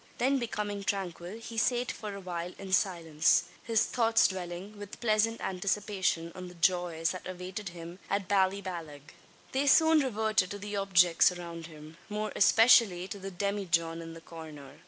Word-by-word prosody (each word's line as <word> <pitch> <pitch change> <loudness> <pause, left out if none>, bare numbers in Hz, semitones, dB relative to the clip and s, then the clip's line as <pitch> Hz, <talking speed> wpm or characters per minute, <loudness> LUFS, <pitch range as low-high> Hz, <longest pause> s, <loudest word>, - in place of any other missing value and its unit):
Then 270 +2 +2
becoming 205 -4 -3
tranquil 190 -1 -3
he 230 0 -5
sate 245 +2 +1
for 210 -3 -7
awhile 180 -2 -5
in 190 -1 -7
silence 165 -5 +2 0.2
his 225 -2 +2
thoughts 225 -2 +3
dwelling 185 +2 -6
with 205 0 -9
pleasant 225 0 +2
anticipation 190 -3 -1
on 185 -1 -8
the 180 - -12
joys 170 -1 +1
that 185 - -7
awaited 185 +2 -6
him 170 +1 -10
at 200 -1 -1
Ballyballagh. 185 -7 -1 0.4
They 275 +2 0
soon 320 +2 +6
reverted 220 -7 +1
to 205 - -5
the 205 +1 -6
objects 180 -3 +4
around 170 -2 -7
him 155 0 -13
more 210 0 -3
especially 210 -4 +5
to 200 - -6
the 195 0 -6
demijohn 175 -4 -1
in 165 0 -9
the 165 - -11
corner. 155 -5 -11
190 Hz, 155 wpm, -30 LUFS, 170-210 Hz, 0.4 s, soon